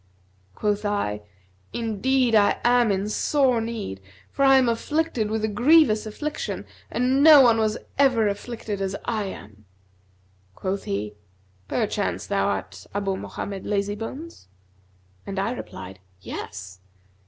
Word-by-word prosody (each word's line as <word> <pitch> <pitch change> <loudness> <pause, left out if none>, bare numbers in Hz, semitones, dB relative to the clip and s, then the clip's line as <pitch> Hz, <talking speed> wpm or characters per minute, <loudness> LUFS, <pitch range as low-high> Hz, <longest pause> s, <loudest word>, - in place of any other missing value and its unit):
Quoth 210 0 -1
I, 200 - -1 0.5
'Indeed 235 +2 +1
I 205 -2 +4
am 240 -2 +4
in 195 +1 -1
sore 255 +2 +2
need, 220 - -5 0.3
for 275 - 0
I 270 0 +7
am 260 -2 +3
afflicted 240 -1 0
with 220 0 -2
a - - +2
grievous 240 -1 +4
affliction 295 +8 -4 0.2
and 255 +3 +1
no 305 -2 +10
one 235 -3 +5
was 215 0 +1 0.2
ever 250 -6 +4
afflicted 205 0 -4
as 195 0 -2
I 215 -3 -1
am!' 105 - -10 0.9
Quoth 195 +1 -3
he, 105 +1 -3 0.5
'Perchance - - -1
thou - - 0
art - - -4
Abu 195 -1 -1
Mohammed 195 0 -6
Lazybones?' 210 - -4 0.8
and 200 0 -5
I 200 +4 0
replied, 95 - -8 0.2
'Yes.' 95 0 -8
215 Hz, 130 wpm, -24 LUFS, 195-250 Hz, 0.9 s, no